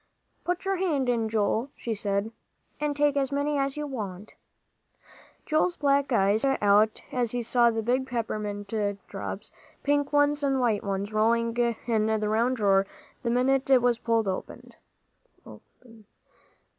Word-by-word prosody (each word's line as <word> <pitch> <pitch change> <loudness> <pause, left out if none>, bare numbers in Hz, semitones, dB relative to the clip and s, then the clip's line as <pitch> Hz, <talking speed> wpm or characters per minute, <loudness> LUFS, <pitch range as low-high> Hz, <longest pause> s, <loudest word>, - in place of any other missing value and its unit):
"Put 355 +2 -2
your 390 0 0
hand 300 -9 0
in, 230 -2 0
Joel," 220 +4 0
she 230 - -4
said, 205 +1 -2 0.5
"and 295 -1 -1
take 290 -1 +2
as 275 -1 0
many's 280 -1 -1
you 300 - -3
want." 210 -7 -6 1.1
Joel's 310 +3 +1
black 280 -1 +1
eyes 205 -1 +3
stuck 270 -1 +2
out 210 +2 +3
as 245 -2 -1
he 245 -1 -1
saw 235 +1 +4
the 225 -1 -2
big 255 +3 0
peppermint 210 -4 -4 0.3
drops, - - -6 0.3
pink 285 0 +1
ones 290 0 +3
and 270 -1 +1
white 225 -5 +1
ones, 200 +1 -3
rolling 230 +2 +2
round 235 -1 0
in 220 -2 +1
the 220 0 +1 0.4
drawer 195 -3 +2 0.3
the 235 - -2
minute 260 +3 +1
it 260 -3 +5
was 240 -1 +2
pulled 230 -2 +1
open. 185 - -5
240 Hz, 145 wpm, -27 LUFS, 215-275 Hz, 1.1 s, it